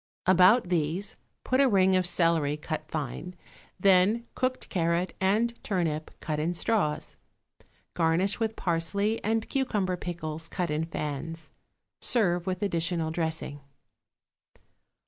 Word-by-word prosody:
About 185 +4 +5
these 170 +3 -1 0.3
put 255 +1 +2
a 275 - +5
ring 190 -3 +4
of 185 -1 +3
celery 165 -4 +2
cut 155 0 -5
fine, 155 +4 -5 0.4
then 195 +5 +4
cooked 255 0 -1
carrot 170 0 0
and 215 +5 +2
turnip 165 -6 -1
cut 155 -1 -3
in 170 +3 -1
straws. 180 -6 -1 0.8
Garnish 175 +5 +2
with 225 -1 -1
parsley 190 +6 0
and 225 +1 0
cucumber 210 -9 0
pickles 165 -2 -5
cut 180 -4 -2
in 155 +2 0
fans. 155 +1 -5 0.5
Serve 180 -7 +1
with 185 +2 -2
additional 170 -3 0
dressing. 160 -3 -3
175 Hz, 120 wpm, -28 LUFS, 160-200 Hz, 0.8 s, About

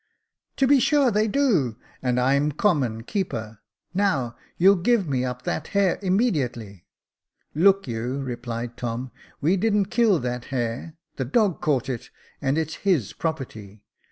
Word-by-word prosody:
•* - - -51
To 270 - +3
be 280 +1 +5
sure 280 -1 +3
they 215 +1 +2
do 200 - +1
— - - -29
and 125 -1 +1
I'm 140 +4 +2
common 130 - +1
keeper. 115 - -4 0.3
Now 155 -12 0 0.2
you'll 195 +3 +6
give 200 +1 +2
me 130 -3 0
up 125 -1 -4
that 155 - -3
hare 195 -3 +3
immediately." 135 - -1 0.3
" - - -66 0.2
Look 195 +3 +4
you," 120 +3 -3
replied 120 -3 -5
Tom, 120 +1 -4
" - - -29
we 170 +7 +3
didn't 205 -1 +1
kill 225 -6 +4
that 125 -2 -3
hare, 125 +4 -3 0.2
the 130 - -1
dog 195 - +1
caught 135 -4 +1
it, 125 -4 -5 0.3
and 140 +1 +1
it 160 -1 0
is 160 - -6
his 175 - +1
property. 110 -10 -5
140 Hz, 165 wpm, -24 LUFS, 120-195 Hz, 0.3 s, you'll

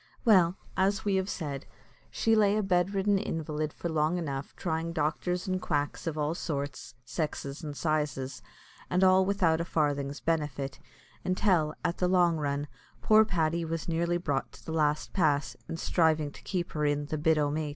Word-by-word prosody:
Well, 185 -5 +5 0.2
as 195 +2 +1
we 200 -2 +2
have 190 +1 -1
said, 145 -7 -4 0.4
she 225 0 +2
lay 210 -1 +4
a 215 - +1
bedridden 195 +2 +2
invalid 155 -3 -3
for 170 - -5
long 160 +1 +1
enough, 140 -4 -4
trying 165 -1 -2
doctors 175 +3 -1
and 185 0 -1
quacks 145 +1 -2
of 160 -1 -2
all 150 +1 0
sorts, 140 -6 -4
sexes, 150 -2 -4
and 145 -2 -5
sizes, 150 -4 -1 0.5
and 180 +1 +2
all 185 0 +6
without 180 -4 +2
a - - 0
farthing's 145 -4 -1
benefit, 145 -4 -2 0.4
until, 185 -5 +2
at 170 - -1
the 180 - +2
long 175 -2 +3
run, 145 -1 -2 0.4
poor 215 0 +7
Paddy 170 -5 0
was 165 -1 -3
nearly 170 +1 +1
brought 145 -6 -2
to - - -15
the - - -5
last 150 -2 0
pass, 155 -6 +1
in 165 - -3
striving 160 -3 +2
to - - -13
keep 180 -2 -3
her 150 - -2
in 145 0 +1
"the 155 +1 -3
bit 160 +1 +3
o' 145 -1 +1
mait." 155 0 -2
160 Hz, 180 wpm, -29 LUFS, 150-180 Hz, 0.5 s, poor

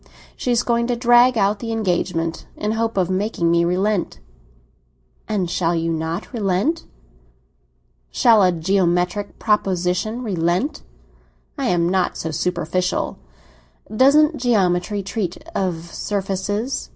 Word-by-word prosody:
She - - -4
is 240 -1 +2
going 235 0 +1
to 245 - 0
drag 240 +1 +5
out 200 0 +2
the 230 +1 -4
engagement, 175 -6 -1
in 210 - -2
the - - -1
hope 225 -2 -1
of 185 -1 +1
making 185 -3 0
me 170 0 +3
relent." 180 - 0 1.1
"And 205 -5 -1
shall 170 0 0
you 165 0 -1
not 165 - -4
relent?" 210 - 0 1.2
"Shall 220 - +4
a 185 -1 +4
geometrical 180 +3 0
proposition 195 +2 0
relent? 190 - -1 0.7
I 275 -4 -2
am 170 -5 +2
not 185 0 0
so 160 - -4
superficial." 180 - -1 0.8
"Doesn't 295 +5 +5
geometry 200 -4 +1
treat 190 -3 -3 0.2
of 170 -3 -3
surfaces?" 205 +5 -3
195 Hz, 125 wpm, -21 LUFS, 175-225 Hz, 1.2 s, drag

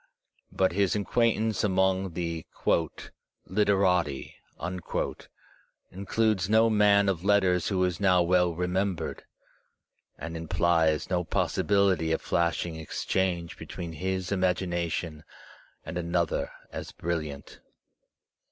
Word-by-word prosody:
But 95 -2 +2
his 100 +2 +1
acquaintance 110 0 +1
among 95 -2 +1
the 85 -1 -4 1.0
"literati" 95 -7 +1 1.6
includes 100 0 0
no 110 +1 +5
man 100 -1 +4
of 90 -3 0
letters 95 -3 +3
who 95 -2 +1
is 90 -1 -1
now 90 -3 +4
well 90 -1 +2
re 90 +2 -1
membered, 90 -2 -2 1.0
and 80 0 -6
implies 80 0 +1
no 90 -1 +1
possibility 95 0 +1
of 80 - +1
flashing 85 -1 -1
exchange 85 +2 -2
be - - -9
tween 85 -2 -6
his 95 +3 -3
imagination 85 -4 -1 0.6
and 90 - -4
another 85 0 -1 0.2
as - - -6
brilliant. 75 -4 -5
90 Hz, 105 wpm, -28 LUFS, 85-100 Hz, 1.6 s, no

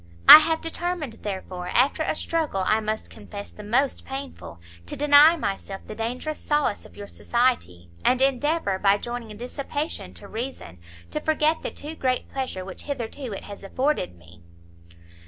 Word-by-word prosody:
I - - +14
have 320 +1 0
determined, 330 -6 -4
therefore, 185 -3 -5
after 255 - +2
a 315 - 0
struggle 305 - -1
I 215 - +3
must 215 0 -4
confess 205 -1 -9
the - - -11
most 245 +6 0
painful, 270 - -7 0.3
to - - -4
deny 295 +3 +7
myself 195 -6 -4
the - - -7
dangerous 245 +8 -4
solace 295 -8 0
of - - -16
your 205 - -7
society, 200 - -1
and 255 - +3
endeavour, 270 - +1
by 200 +1 +4
joining 230 -1 -6
dissipation 270 - -5
to 85 - -10
reason, 220 - -6 0.3
to - - -1
forget 315 +1 +1
the - - -3
too 300 +2 -7
great 255 -5 -1
pleasure 255 -9 -4
which 190 - -8
hitherto 260 -2 -5
it 195 - -6
has 200 -1 -10
afforded 255 - -1
me." 85 0 -18
245 Hz, 160 wpm, -25 LUFS, 200-290 Hz, 0.3 s, I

